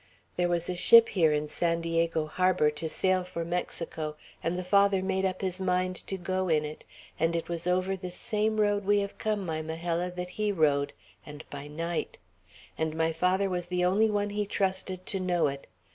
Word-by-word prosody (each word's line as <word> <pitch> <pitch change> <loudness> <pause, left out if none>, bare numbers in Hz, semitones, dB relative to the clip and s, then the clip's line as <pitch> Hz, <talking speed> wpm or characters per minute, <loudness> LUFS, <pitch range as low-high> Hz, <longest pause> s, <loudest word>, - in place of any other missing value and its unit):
There 175 0 +1
was 175 -1 0
a 180 - -2
ship 230 +5 +7
here 165 -6 +3
in 150 0 0
San 170 +2 0
Diego 165 -1 0
harbor, 180 -1 +2
to 155 +2 -4
sail 185 +2 +1
for 170 -2 -5
Mexico, 165 -3 -3 0.3
and 170 +2 -1
the 180 - -3
Father 200 0 +3
made 190 0 0
up 185 -1 -2
his 190 -1 -2
mind 185 0 +1
to 195 - -3
go 185 0 -2
in 155 -2 +2
it; 150 +1 -8 0.4
and 165 +1 +2
it 165 - -2
was 170 0 -3
over 185 +2 +1
this 180 -1 -6
same 215 +1 0
road 205 -1 +2
we 205 +1 +3
have 200 0 -6
come, 210 -3 -1
my 160 -2 -2
Majella, 165 +2 -2
that 180 0 -5
he 210 +2 -1
rode, 145 -6 +2 0.3
and 150 +1 -10
by 145 0 -7
night; 165 +3 -3 0.6
and 160 0 -1
my 160 0 +1
father 185 +4 +2
was 180 -2 -2
the 180 0 0
only 205 +5 +3
one 205 -1 0
he 205 0 -1
trusted 185 -2 -1
to 195 - -2
know 180 -3 +1
it. 140 0 -8
180 Hz, 205 wpm, -29 LUFS, 165-190 Hz, 0.6 s, ship